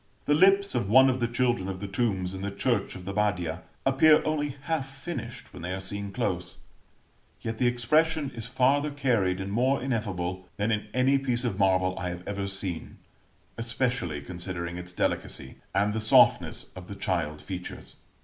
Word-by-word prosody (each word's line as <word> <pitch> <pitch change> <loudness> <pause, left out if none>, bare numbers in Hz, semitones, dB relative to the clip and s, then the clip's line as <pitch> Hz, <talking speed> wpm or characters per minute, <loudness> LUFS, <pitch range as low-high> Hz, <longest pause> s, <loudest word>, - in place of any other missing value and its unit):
The 145 - +3
lips 195 +5 +5
of 120 -6 -1
one 130 +4 +7
of 130 - -2
the 120 - +1
children 120 -5 0
on 95 - -4
the 100 - -5
tombs 95 -3 -1
in 95 - -6
the 100 - -2
church 115 +5 -1
of 90 -1 -9
the 100 - -4
Badia, 90 -5 0 0.2
appear 150 +3 +5
only 150 -3 -1
half 155 -3 -1
finished 135 -4 -7
when 90 - -9
they 90 +2 -3
are - - -4
seen 100 +1 -4
close; 90 -6 -2 0.8
yet 110 -1 -4
the 125 - +3
expression 150 +5 +2
is 115 -2 -6
farther 135 +4 +2
carried 115 -10 +1
and 95 +1 -4
more 130 +5 +2
ineffable, 95 -7 -2
than 105 +3 +1
in 105 -1 -1
any 130 +3 +3
piece 125 -2 -1
of 110 -5 -2
marble 95 -1 +3
I 90 - -2
have 85 +1 -7
ever 100 -1 -2
seen, 95 -3 -4 0.6
especially 115 - -1
considering 85 +2 -5
its 90 0 -7
delicacy, 65 -5 -2 0.2
and 105 +1 +2
the 110 - -1
softness 110 0 +4
of 90 -1 -9
the 100 - -7
child 85 -6 -1
features. 90 -2 -7
105 Hz, 180 wpm, -28 LUFS, 95-130 Hz, 0.8 s, one